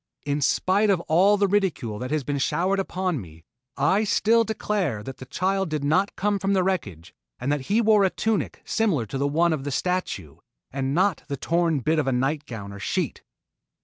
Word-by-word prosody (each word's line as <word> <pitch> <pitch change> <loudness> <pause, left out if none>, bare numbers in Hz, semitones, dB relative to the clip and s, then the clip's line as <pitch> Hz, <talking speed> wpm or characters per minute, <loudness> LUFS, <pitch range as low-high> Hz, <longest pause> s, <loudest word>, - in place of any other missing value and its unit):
In 145 0 -1
spite 195 +8 +2
of 190 -3 +3
all 190 +6 +4
the 200 0 +2
ridicule 180 - 0
that 125 - -4
has 155 -2 -1
been 140 +1 -2
showered 180 +8 +1
upon 185 -6 -2
me, 80 -3 -14 0.3
I 190 +10 +3
still 225 +2 +3
declare 205 - -2
that 135 +4 -8
the 130 - -10
child 190 +5 0
did 155 -2 -2
not 180 +8 +1
come 205 +1 0
from 195 +1 0
the 190 -2 +3
wreckage 100 - -3 0.3
and 135 - -1
that 145 -3 -2
he 215 +4 +3
wore 215 -2 +4
a 190 - +4
tunic 220 +2 -2
similar 190 - +1
to 130 +6 -5
the 140 - +1
one 165 +3 +2
of 145 -4 -3
the 145 - -3
statue 140 - -2 0.3
and 135 +1 -2
not 185 -1 +2
the 140 -2 -3
torn 165 -1 +1
bit 155 +5 +1
of 145 - -1
a - - +2
nightgown 125 -6 -2
or 100 - -9
sheet. - - -2
160 Hz, 205 wpm, -24 LUFS, 135-195 Hz, 0.3 s, all